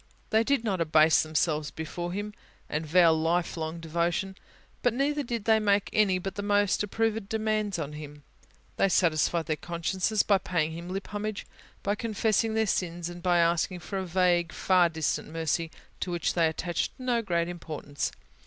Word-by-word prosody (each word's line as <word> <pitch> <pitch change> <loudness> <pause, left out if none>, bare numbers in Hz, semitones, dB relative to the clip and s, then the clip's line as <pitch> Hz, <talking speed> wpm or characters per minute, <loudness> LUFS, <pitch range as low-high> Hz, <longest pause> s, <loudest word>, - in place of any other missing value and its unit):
They 220 +1 +4
did 275 -1 +1
not 195 -6 -1
abase 155 0 +5
themselves 155 -1 0
before 175 +3 -5
Him, 205 +3 -4 0.3
and 155 +1 -3
vow 170 +1 +6
a - - +4
lifelong 165 0 -1
devotion; 170 +4 -1 0.5
but 245 -2 +2
neither 290 +3 +1
did 235 -5 -4
they 220 -1 +5
make 205 -1 +1
any 200 -3 +3
but 190 +1 -4
the 205 - -4
most 205 -1 +2
approved 220 0 -1
demands 215 -3 0
on 150 -2 -4
Him. 150 -1 -9 0.5
They 195 - +3
satisfied 170 -2 +2
their 155 0 -1
consciences 180 +5 0
by 200 -2 +3
paying 165 -4 -1
Him 170 +2 -7
lip 195 +1 -5
homage, 210 0 -3 0.4
by 200 - +1
confessing 220 0 0
their 220 0 +2
sins, 175 -3 -2
and 175 0 -9
by 175 0 +3
asking 170 +1 +1
for 195 +4 -4
a - - -2
vague, 175 -1 +2
far 180 -2 +3
distant 160 -1 -2
mercy, 165 +1 -1 0.3
to - - -3
which 175 -2 -1
they 165 -2 +3
attached 170 +2 -2
no 250 -2 0
great 170 -5 0
importance. 155 -5 -4
175 Hz, 175 wpm, -28 LUFS, 165-205 Hz, 0.5 s, vow